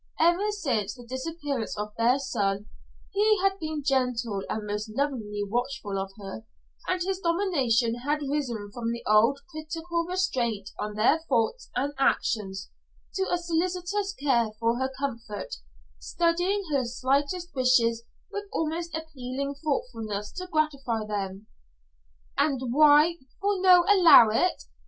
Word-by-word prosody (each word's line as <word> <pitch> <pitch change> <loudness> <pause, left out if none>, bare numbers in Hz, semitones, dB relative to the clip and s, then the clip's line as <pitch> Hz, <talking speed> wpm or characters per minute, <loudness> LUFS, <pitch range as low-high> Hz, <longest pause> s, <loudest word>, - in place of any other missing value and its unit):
Ever 345 +5 +3
since 245 - -1
the 245 - -12
disappearance 275 -1 -4
of 210 0 -4
their 235 +3 +3
son, 205 -7 -1 0.5
he 425 +1 +3
had 390 0 +2
been 310 -2 -4
gentle 250 -6 0
and 215 -1 -3
most 210 +1 -3
lovingly 220 -5 -2
watchful 235 -3 -2
of 195 0 -3
her, 195 +2 -7 0.4
and 370 0 0
his 380 0 -2
domination 310 - +1
had 295 +4 -1
risen 240 -8 -2
from 230 -1 -2
the 235 - -6
old 230 +6 +4
critical 330 +2 -3
restraint 260 - -1
on 210 0 -4
her 230 +9 +4
thoughts 265 - 0
and 280 +3 -1
actions 195 -7 0 0.4
to 385 0 -1
a 355 - +3
solicitous 360 +4 -1
care 245 -6 +2
for 230 +1 +1
her 260 0 -1
comfort, 230 - -4 0.4
studying 350 - 0
her 275 -3 +2
slightest 280 +8 -1
wishes 240 -3 +3 0.3
with 410 0 -4
almost 325 +1 -2
appealing 280 -3 -5
thoughtfulness 225 -8 -3
to 365 -1 -6
gratify 275 -9 -1
them. 200 -1 -4 0.9
"And 265 -4 +1
why 305 +3 +6 0.2
for 400 -1 0
no 360 -2 +7
allow 350 - +8
it? 215 - +1
270 Hz, 135 wpm, -27 LUFS, 230-335 Hz, 0.9 s, allow